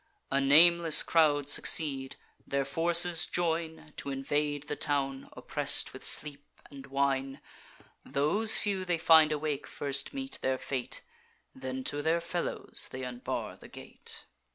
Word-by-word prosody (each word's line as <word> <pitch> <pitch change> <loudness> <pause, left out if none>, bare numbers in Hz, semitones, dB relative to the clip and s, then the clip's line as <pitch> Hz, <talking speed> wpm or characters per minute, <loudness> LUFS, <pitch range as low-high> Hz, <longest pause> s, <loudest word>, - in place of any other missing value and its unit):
A 135 +1 +1
nameless 165 +3 +5
crowd 145 -4 +1
succeed; 140 -2 +3 0.3
their 140 0 -2
forces 170 +3 +3
join 160 -2 -4
T' 140 - -5
invade 145 +2 -3
the 145 0 -6
town, 135 -3 -3
oppress'd - - 0
with - - -11
sleep 145 -1 +1 0.3
and 140 -1 -12
wine. 135 0 -2 0.6
Those 200 +11 +3
few 195 -3 -1
they 175 -2 -2
find 160 -2 +4
awake 150 -1 -4
first 140 -1 -4
meet 270 -1 -7
their 130 0 -1
fate; 130 -1 -6 0.5
Then 130 0 -7
to 145 +2 -2
their 160 +3 0
fellows 170 +1 -3
they 130 +1 -7
unbar 125 -1 -6
the - - -15
gate. - - -11
145 Hz, 135 wpm, -29 LUFS, 135-165 Hz, 0.6 s, nameless